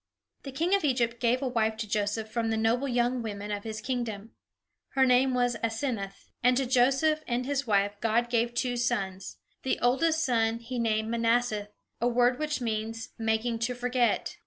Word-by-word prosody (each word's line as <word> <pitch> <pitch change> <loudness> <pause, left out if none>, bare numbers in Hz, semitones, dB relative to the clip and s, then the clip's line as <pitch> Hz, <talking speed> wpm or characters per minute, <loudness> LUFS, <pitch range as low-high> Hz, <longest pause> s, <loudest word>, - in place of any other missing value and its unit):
The 275 - -7
king 335 +8 0
of 400 - +3
Egypt 240 -4 +1
gave 250 +2 +1
a - - 0
wife 220 -3 0
to 220 -1 -4
Joseph 210 +1 -1
from 225 0 -2
the 220 - 0
noble 230 +5 +1
young 245 0 +1
women 205 -2 -5
of 205 -1 -3
his 220 -1 -5
kingdom. 225 -4 -4 0.6
Her 265 -1 +5
name 255 +1 +3
was 245 -1 +1
Asenath; 225 -4 -3
and 250 0 +4
to 270 - +1
Joseph 270 +5 +3
and 245 0 -1
his 280 -1 -1
wife 200 -1 +2
God 230 +1 +2
gave 235 0 0
two 245 -1 0
sons. 195 -6 -2 0.2
The 265 - 0
oldest 315 +7 +2
son 225 -2 +1
he 235 +2 -5
named 220 -1 0
Manasseh, 230 -2 +1 0.3
a 240 - +3
word 245 +1 +2
which 305 -1 -1
means 225 -1 -3
"Making 225 +1 0
to 240 +2 -1
Forget." 245 0 0
240 Hz, 185 wpm, -28 LUFS, 220-250 Hz, 0.6 s, Her